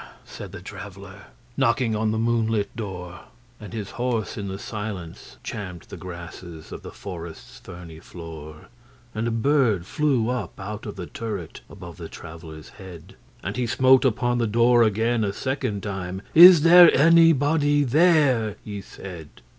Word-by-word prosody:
said - - -10
the - - -10
Traveller, 95 -1 -10 0.3
Knocking 120 -3 +1
on 110 0 0
the 110 - -1
moonlit 115 -2 0
door; 90 -6 -7 0.3
And 105 -4 -10
his 105 -2 -6
horse 115 -4 -2
in 100 -2 -5
the 95 0 -5
silence 105 -5 -7
champed 90 -6 -7
the - - -8
grassesOf 85 -2 -10
the - - -9
forest's 85 -4 -10
ferny 85 -3 -11
floor. 80 -3 -11 0.5
And 110 +2 -2
a - - +1
bird 115 - +1
flew 135 - 0
up 125 -4 -4
out 105 +3 -7
of 105 - -7
the 90 - -6
turret, 100 -5 -7
Above 85 -4 -11
the 85 -2 -8
Traveller's 80 -2 -11
head:And 95 +2 -11
he 125 -1 -1
smote 130 +3 +4
upon 120 -1 0
the 115 - +1
door 120 +2 +4
again 115 +1 +1
a 100 - -1
second 130 -5 -3
time;'Is 105 - +5
there 175 0 +8
anybody 150 -2 +4
there?' 140 - +3
he 100 -2 -6
said. 85 -6 -10
105 Hz, 145 wpm, -23 LUFS, 90-125 Hz, 0.5 s, there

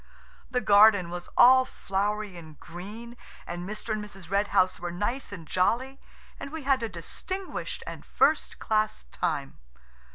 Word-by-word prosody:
The 250 -1 0
garden 205 -4 +6
was 175 0 -6
all 260 +2 +8
flowery 205 -3 -2
and 160 -3 -12
green, 210 +8 -9 0.3
and 175 +2 -6
Mr. 215 +1 -4
and 215 -1 -3
Mrs. 195 -4 -11
Red 200 +1 +2
House 185 -2 +2
were 175 - -4
nice 205 +9 -3
and 180 -5 -8
jolly, 250 - 0 0.4
and 275 - -7
we 320 -1 -6
had 270 -1 +2
a 230 - -2
distinguished 375 - -5
and - - -8
first - - +1
class 215 0 0
time. 140 - -2
210 Hz, 155 wpm, -27 LUFS, 180-235 Hz, 0.4 s, all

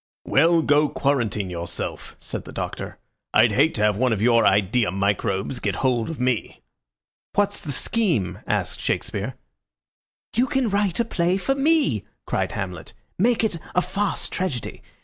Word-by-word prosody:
"Well, 165 +3 +4
go 145 0 +3
quarantine 110 -9 0
yourself," 85 0 -5
said - - -6
the - - -9
Doctor. - - -5 0.4
"I'd - - +6
hate 155 +4 +3
to 105 - 0
have 105 -1 +3
one 130 +1 +2
of 110 - 0
your 115 +1 +4
idea 105 +3 +3
microbes 100 +4 -1
get - - -1
hold 120 -1 +1
of 165 - -5
me." 125 -3 -1 0.7
"What's 205 0 +1
the 155 -7 -5
scheme?" 170 - 0
asked - - -1
Shakespeare. - - -2 1.0
"You 245 +3 +3
can 260 -6 0
write 200 -2 +1
a 235 - +2
play 180 -4 +1
for 270 +8 0
me!" 275 - +2 0.2
cried - - -1
Hamlet. 90 -3 -5 0.3
"Make 230 +3 +3
it 200 -7 0 0.2
a 180 - +5
farce 205 0 -1
tragedy. 160 -11 -3
140 Hz, 155 wpm, -23 LUFS, -, 1.0 s, I'd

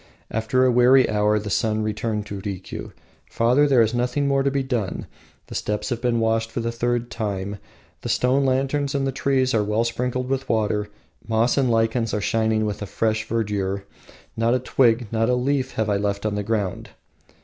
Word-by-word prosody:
After 115 +4 +1
a 130 - +4
weary 125 +2 +5
hour 105 0 +2
the 105 -1 -4
son 110 0 0
turned 105 -2 -3
to 100 -1 -6
Rikiu: 95 -2 -6 0.4
"Father, 125 +6 +3
there 130 -5 +5
is 110 +1 -1
nothing 125 +4 0
more 140 0 +2
to 140 - +2
be 135 0 -1
done. 120 -8 -2 0.4
The - - -11
steps 105 0 -2
have 120 -2 -3
been 120 -2 +1
washed 115 0 +1
for 115 - -4
the 115 0 -2
third 120 0 -1
time, 100 -2 -3 0.4
the - - -5
stone 130 +3 +2
lanterns 135 +2 0
and 135 -1 0
the 135 - 0
trees 130 -1 +1
are 110 -2 +2
well 105 +2 +1
sprinkled 125 +2 -2
with 135 0 -2
water, 105 -2 0 0.4
moss 115 +2 +2
and 135 -3 +2
lichens 115 0 +1
are - - 0
shining 110 +1 +1
with 105 0 -3
a 105 - -4
fresh 110 +1 -1
verdure; 100 -4 -1 0.5
not 115 +2 +2
a - - +1
twig, 120 -1 +2
not 115 +1 +1
a 125 - +3
leaf 130 +1 0
have 110 0 -1
I 100 -1 +1
left 100 0 -2
on 105 - 0
the 105 - -1
ground." 105 -3 -2
115 Hz, 200 wpm, -23 LUFS, 105-125 Hz, 0.5 s, weary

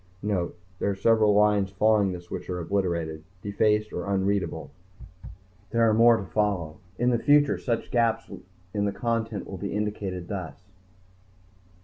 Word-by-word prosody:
_(Note: 100 -5 -1 0.3
There - - 0
are 100 - -1
several 110 0 +3
lines 105 -2 +3
following 100 0 +2
this 90 -1 -9
which - - -6
are 90 - -2
obliterated, 85 -4 -2 0.2
defaced 105 +1 +1
or - - -4
unreadable. 100 0 -1 1.0
There 115 0 +3
are 110 - +4
more 115 +1 +6
to 100 - -4
follow. 90 -3 -1 0.2
In 125 +1 +2
the 120 - +1
future 145 +1 +4
such 115 -3 -2
gaps 115 -2 +1 0.5
in 100 -1 0
the 100 - 0
content 115 -3 -2
will 95 - -8
be 100 +1 -4
indicated 100 -4 -3
thus 90 -8 -5
105 Hz, 150 wpm, -26 LUFS, 95-110 Hz, 1.0 s, more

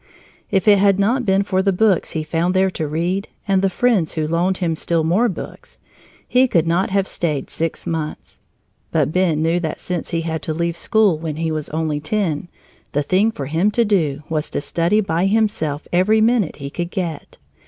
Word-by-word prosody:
If 195 +1 0
it 205 -2 +7
had 200 -1 +4
not 235 +5 +1
been 195 +1 +3
for 190 -1 0
the 195 0 +2
books 195 -1 +2
he 160 - -2
found 165 +4 -1
there 190 0 +3
to 160 -4 -3
read 175 +6 -1 0.2
and 195 -1 +2
the 195 - +2
friends 205 -5 +1
who 155 -1 -1
loaned 175 +4 +1
him 165 -3 -1
still 165 0 0
more 195 +10 +2
books, 185 - -8 0.5
he 255 +1 +4
could 170 -9 +2
not 170 +3 +1
have 195 0 +1
stayed 150 -5 -2
six 165 0 -3
months. 160 -2 -4 0.5
But - - +1
Ben 165 -3 +1
knew 165 +2 +2
that 160 -3 -4
since 180 -2 -4
he 165 - -1
had 160 -1 -3
to 155 - -3
leave 170 0 -1
school 205 -5 +2
when 160 -2 -4
he 160 0 -2
was 155 -2 -3
only 155 -1 -1
ten, 165 -1 -1 0.5
the 145 - +1
thing 195 +9 +2
for 145 -10 -6
him 165 +8 +1
to 230 +2 +2
do 155 -9 0
was 155 -2 -2
to - - -2
study 170 +8 +1
by 175 -1 0
himself 195 -9 0
every 200 +5 +4
minute 220 -5 +2
he 140 -1 -7
could 175 +2 -4
get. 175 -6 -5
175 Hz, 205 wpm, -20 LUFS, 160-195 Hz, 0.5 s, it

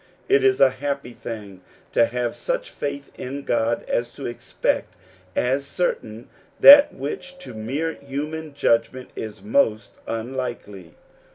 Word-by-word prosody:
It 410 +1 +4
is 395 -1 +4
a 130 - +6
happy 140 -1 -4
thing 105 -6 -8 0.3
to 115 - +4
have 120 0 -2
such - - -3
faith 140 -1 -5
in 140 +2 -5
God 115 -1 0
as 120 0 -1
to 140 - -8
expect 120 +2 -2 0.4
as 135 +3 +1
certain 120 -8 -3 0.3
that 285 +1 +10
which 150 - -6
to 270 - -10
mere 135 +10 -2
human 150 +2 -6
judgment 125 -1 +1
is 105 -3 -7
most 110 0 +1
unlikely. 115 -6 -5
130 Hz, 130 wpm, -23 LUFS, 115-145 Hz, 0.4 s, that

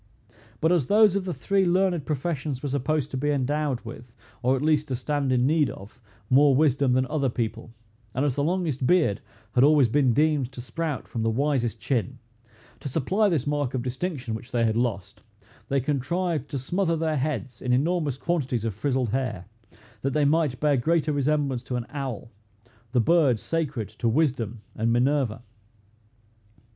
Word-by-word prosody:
But 160 - +3
as 165 -8 +2
those 210 -2 +5
of 195 -2 -1
the 185 - -2
three 195 +2 +1
learned 180 -3 +1
professions 150 -2 -2
were 145 - -2
supposed 140 +1 -1
to 130 - -3
be 145 +3 0
endowed 145 -1 0
with, 115 0 -10 0.3
or 130 +1 +2
at 135 - -3
least 150 -1 +2
to 130 - -2
stand 140 +1 -1
in 125 -1 +3
need 150 0 +3
of, 105 +6 -11 0.3
more 135 +2 +5
wisdom 140 -3 +3
than 130 +1 +2
other 140 -1 0
people, 115 -1 -3 0.5
and 135 +3 +1
as 145 - +1
the 140 - -1
longest 155 -6 0
beard 165 - +3 0.3
had 125 - +4
always 145 -4 +5
been 135 +1 +3
deemed 145 -1 +1
to 125 - -9
sprout 140 +4 -4
from 115 - -4
the 115 - +1
wisest 120 -2 0
chin, 130 -1 -1 0.6
to 140 - -5
supply 190 - +1
this 155 -8 0
mark 145 -3 -1
of 125 - -2
distinction, 130 -1 -3
which 120 +3 -7
they 120 -2 +1
had 110 -1 +1
lost, 100 -5 -2 0.5
they 140 - +2
contrived 150 +4 -1
to 140 - -3
smother 170 +6 0
their 160 -1 0
heads 130 -4 -3
in 125 - -1
enormous 150 +1 +1
quantities 130 -6 -1
of 110 - -1
frizzled 125 +3 -1
hair, 120 -6 -2 0.6
that 135 0 -1
they 150 -1 +2
might 145 -3 +1
bear 145 -2 +2
greater 155 +3 +1
resemblance 140 -2 0
to 125 +1 -5
an 120 -1 -2
owl, 130 -6 -5 0.6
the 125 - +2
bird 145 -3 +3
sacred 145 -9 -2
to 115 - -2
wisdom 120 -5 0
and 115 +1 0
Minerva. 120 -2 +1
135 Hz, 180 wpm, -25 LUFS, 125-155 Hz, 0.6 s, those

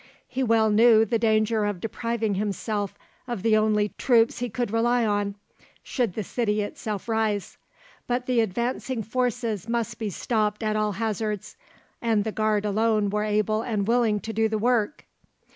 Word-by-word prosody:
He 260 - -3
well 225 -3 +3
knew 225 +1 +6
the 225 +1 0
danger 220 -1 +2
of 205 -3 -1
depriving 225 +1 -2
himself 205 0 -2 0.3
of 240 -6 -4
the 225 -1 +4
only 215 -1 +2
troops 230 -3 +3
he 245 0 -2
could 240 -1 -2
rely 235 +1 +2
on, 205 -1 0 0.5
should 240 -8 -1
the 215 - -2
city 210 0 0
itself 205 0 -5
rise; 220 -3 -1 0.5
but 245 +1 -1
the 250 -2 +1
advancing 235 +3 -1
forces 230 -2 -2
must 235 -1 -2
be 220 -2 -2
stopped 210 +2 -1
at 215 0 0
all 215 -1 0
hazards, 215 -1 -3 0.5
and 225 -3 +2
the 220 - -2
Guard 215 -1 0
alone 210 0 +1
were 210 +1 0
able 215 +1 +1
and 215 -4 -2
willing 230 -3 +2
to 225 - -5
do 220 0 +2
the 220 - 0
work. 240 +3 0
220 Hz, 165 wpm, -25 LUFS, 210-235 Hz, 0.5 s, knew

